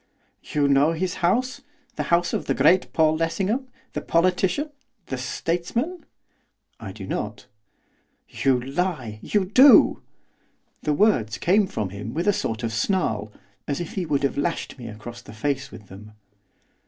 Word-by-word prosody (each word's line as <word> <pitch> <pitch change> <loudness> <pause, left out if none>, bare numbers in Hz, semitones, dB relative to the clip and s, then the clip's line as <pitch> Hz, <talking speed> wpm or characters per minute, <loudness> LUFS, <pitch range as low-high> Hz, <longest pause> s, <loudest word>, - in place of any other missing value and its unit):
'You 145 -1 0
know 140 +3 +4
his 180 +2 -2
house, 250 +10 +1 0.3
the - - -2
house 175 0 +2
of - - -1
the - - +1
great 165 +7 +4
Paul 155 -1 +3
Lessingham, 195 +10 -1 0.3
the - - -3
politician, 185 - +1 0.3
the 135 - -4
statesman?' 175 - -2 0.7
'I 110 -4 -7
do 100 -2 -8
not.' 105 +2 -4 0.8
'You 130 -2 +1
lie! 135 - -3
you 205 -3 0
do!' 255 +9 +7 0.8
The 150 - 0
words 130 - +2
came 195 +3 +3
from 105 - -3
him 100 +5 -7
with 170 +5 -1
a 205 - +5
sort 115 -8 -3
of 115 -1 -2
snarl, 110 - 0 0.4
as 140 - -2
if 175 - -5
he 185 -4 -3
would 140 -2 0
have 140 0 0
lashed 165 -3 -2
me 120 - -7
across 115 +2 -9
the 110 - -12
face 135 +4 -2
with 105 - -12
them. 105 +3 -12
150 Hz, 155 wpm, -24 LUFS, 115-185 Hz, 0.8 s, do